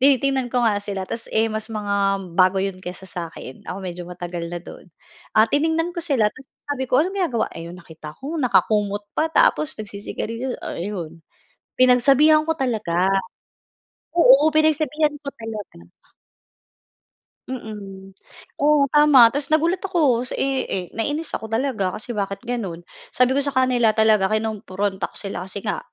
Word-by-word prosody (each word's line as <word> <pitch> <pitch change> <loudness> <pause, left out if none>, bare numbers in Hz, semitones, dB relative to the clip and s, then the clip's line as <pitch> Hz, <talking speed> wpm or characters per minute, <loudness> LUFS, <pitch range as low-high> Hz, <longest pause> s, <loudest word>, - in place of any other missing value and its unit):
tinitingnan 270 -1 +3
ko 245 0 +1
nga 210 -3 +2
sila 200 -2 -4
ta’s, 230 - -6
eh, 220 +1 +2
mas 215 +1 -3
mga 210 -2 -3 0.4
bago 185 +2 +4
'yon 190 -1 -2
kaysa 180 +1 -8
sa'kin, 165 -7 -7
ako 185 - -4
medyo 180 -1 -5
matagal 175 -1 -6
na 175 - -5
do'n. 180 +1 -13 0.5
Ah, 215 - +7
tiningnan 320 +5 0
ko 345 - -4
sila 265 -11 +1
tapos 260 - -11 0.2
sabi 270 -3 -3
ko 250 - +3
anong 375 +2 -4
ginagawa 245 -10 0
ayon, 170 +2 -8
nakita 160 -3 -11
ko 285 +5 -6
nakakumot 210 -5 +1
pa 320 - 0
tapos 310 -1 +3
nagsisigarilyo. 220 +4 -5
Ayon, 170 -3 -5 0.6
pinagsabihan 270 +5 +5
ko 320 - -1
talaga. 215 - 0 1.1
Oo, 295 -2 +7
pinagsabihan 310 -1 +2
ko 285 - -7
talaga. 210 - -8 1.6
Mm. 200 -6 -8 0.5
Oo, 290 -1 +4
tama. 295 -6 +7
Tapos 285 +2 -2
nagulat 330 +4 +2
ako 280 -10 +2
sa, - - -4
eh, 270 -1 0
eh, 185 -2 -3
nainis 290 +8 -3
ako 220 - -4
talaga 225 -5 -1
kasi 230 - -5
bakit 200 -1 -3
gano'n. 210 -9 -4 0.3
Sabi 250 0 +4
ko - - +4
sa 280 -1 -2
kanila 245 -4 +3
talaga 220 -3 +4
kinumpronta 205 -3 -2
ko - - -22
sila 195 -2 -5
kasi 195 +1 -5
nga, 210 - -2
225 Hz, 155 wpm, -22 LUFS, 195-275 Hz, 1.6 s, Ah